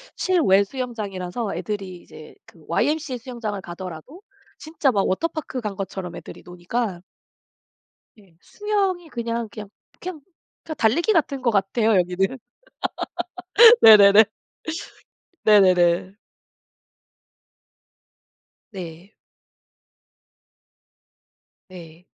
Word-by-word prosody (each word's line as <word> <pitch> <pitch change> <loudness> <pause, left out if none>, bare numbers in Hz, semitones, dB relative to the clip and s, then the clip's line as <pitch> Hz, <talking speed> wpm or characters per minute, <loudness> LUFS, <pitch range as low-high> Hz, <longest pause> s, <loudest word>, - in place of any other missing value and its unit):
실외 300 - +3
수영장이라서 210 -3 -5
애들이 195 -4 -5
이제 155 -2 -14
그 165 - -20
YMCA 290 - -1
수영장을 230 -5 -6
가더라도 180 - -9 0.4
진짜 310 -3 -1
막 200 -4 0
워터파크 310 - -3
간 210 -4 -5
것처럼 190 -2 -6
애들이 - - -11
노니까 180 +2 -4 1.2
예. 190 -5 -23
수영이 390 -5 -2
그냥 235 -3 -4
그냥 210 -1 -10 0.3
그냥 355 -4 -7 0.4
그냥 315 - -6
달리기 335 - +2
같은 280 -6 0
것 245 - +1
같아요 215 +2 +1
여기는. 190 +8 -1 1.4
네네네. 210 -1 +9 1.2
네네네. 185 -3 +4 2.6
네. 180 0 -10 2.5
네. 175 -2 -13
210 Hz, 205 characters per minute, -22 LUFS, 185-255 Hz, 2.6 s, 네네네